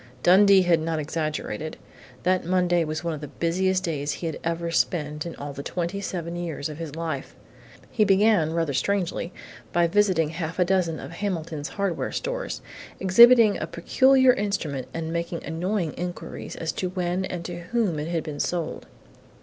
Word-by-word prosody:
Dundee 195 +1 +7
had 175 -2 +3
not 160 0 -2
exaggerated. 155 0 -3 0.5
That 185 +1 +2
Monday 175 -1 +2
was 155 +1 -4
one 170 -1 -1
of 155 - -6
the 150 - -5
busiest 185 +6 0
days 145 -4 -2
he 170 - -6
had 160 - -3
ever 170 0 -2
spent 150 -2 0
in 170 - -7
all 145 0 -6
the 140 - -6
twenty 175 +6 -3
seven 170 -3 -4
years 165 -4 -4
of 150 +1 -8
his 155 -3 -6
life. 160 -5 -4 0.6
He 215 - +3
began, 195 -5 +4
rather 165 -4 0
strangely, 185 +1 -1 0.4
by 175 0 +3
visiting 175 -3 +2
half 165 0 -4
a 180 - +3
dozen 175 -3 +1
of - - -8
Hamilton's 165 -5 -3
hardware 195 -5 -2
stores, - - -3 0.4
exhibiting 230 +3 +7
a - - -3
peculiar 260 +8 +4
instrument 170 - -2
and 165 0 -4
making 170 0 -3
annoying 175 +1 -1
inquiries 175 0 -6
as 165 -1 -2
to 185 - -3
when 180 0 -1
and 175 -2 -5
to 175 -1 -5
whom 180 -3 -1
it 150 - -3
had 165 -2 -1
been 150 -2 -6
sold. 175 -2 -2
170 Hz, 175 wpm, -25 LUFS, 160-190 Hz, 0.6 s, Dundee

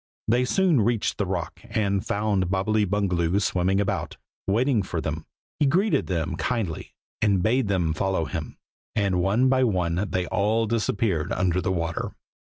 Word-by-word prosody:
They 120 +3 +3
soon 175 - +3
reached 115 0 0
the 100 - 0
rock, 90 -4 -3
and 100 -3 -1
found 100 -3 0
Bobbily 105 +3 +1
Bungaloo 90 -2 +1
swimming 95 0 +1
about, 100 - -2 0.3
waiting 115 +3 +2
for 90 -3 -3
them. 80 0 -4 0.3
He 145 - +4
greeted 190 +9 +2
them 85 -2 -2
kindly, 110 -11 -3 0.3
and 100 -4 +2
bade 120 +2 +2
them 90 -5 +1
follow 95 0 0
him, - - -5 0.4
and 100 -4 +1
one 105 +8 +3
by 130 0 +3
one 90 -3 0
they 90 -1 -1
all 110 +5 +1
disappeared 105 -6 0
under 90 0 +1
the 95 - -1
water. 85 -3 -2
100 Hz, 160 wpm, -25 LUFS, 90-110 Hz, 0.4 s, He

